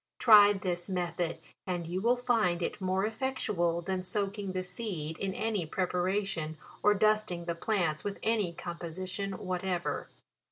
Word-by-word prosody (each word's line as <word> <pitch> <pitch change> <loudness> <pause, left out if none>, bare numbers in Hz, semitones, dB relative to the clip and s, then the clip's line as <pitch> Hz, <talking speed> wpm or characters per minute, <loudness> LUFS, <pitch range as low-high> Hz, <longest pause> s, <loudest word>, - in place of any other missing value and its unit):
Try 205 -3 +8
this 180 -2 -3
method, 175 -2 -1 0.3
and 175 -2 -2
you 180 +3 -2
will 235 +3 +4
find 225 -8 +1
it 200 - -3
more 190 +1 +1
effectual 210 -8 -1
than 185 +1 -1
soaking 200 0 -2
the 185 0 -1
seed 180 -6 -4
in 195 -1 -2
any 215 -5 0
pre 185 +4 0
paration, 180 -3 -1 0.3
or 210 0 +5
dusting 215 -5 +2
the 170 - -1
plants 170 -4 0
with 205 -1 -3
any 215 -5 +1
com 170 0 -7
position 185 +3 -4
whatever. 185 -1 -2
185 Hz, 155 wpm, -31 LUFS, 175-210 Hz, 0.3 s, Try